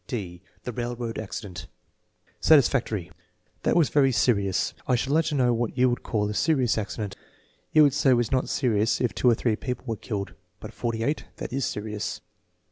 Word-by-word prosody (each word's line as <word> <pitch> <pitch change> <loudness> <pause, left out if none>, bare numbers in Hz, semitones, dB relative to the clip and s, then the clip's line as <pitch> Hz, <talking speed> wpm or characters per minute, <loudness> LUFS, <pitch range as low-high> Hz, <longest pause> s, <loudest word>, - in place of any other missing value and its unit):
'" - - -43
(d) 90 -4 -7 0.2
The 125 - -4
railroad 120 -1 -4
accident 95 -5 -7 0.7
Satisfactory. 120 - +3 0.5
"That - - +1
was 165 -5 +4
very 135 -2 +4
serious." 100 -5 +1
"I 125 - +3
should 130 +3 -1
like 160 +2 +3
to 150 - -1
know 125 -3 +3
j 115 - -1
what 120 -2 -2
you 125 0 +4
would 120 - -2
call 105 -2 -1
a 105 - -3
serious 130 -2 +2
accident!" 105 -1 -4 0.6
"You 155 - +7
could 145 -3 +4
say 140 - +2
it - - +7
was 120 -2 +1
not 130 -1 +1
serious 110 -5 +1
if 125 - 0
two 125 - +3
or 115 - +4
three 110 -1 0
people 125 +2 -5
were 115 -3 -2
killed, 100 -2 -5 0.3
but - - -9
forty 115 -2 -2
eight, 145 +5 -1
that - - -6
is 135 0 0
serious." 105 0 -4
120 Hz, 205 wpm, -26 LUFS, 105-130 Hz, 0.7 s, You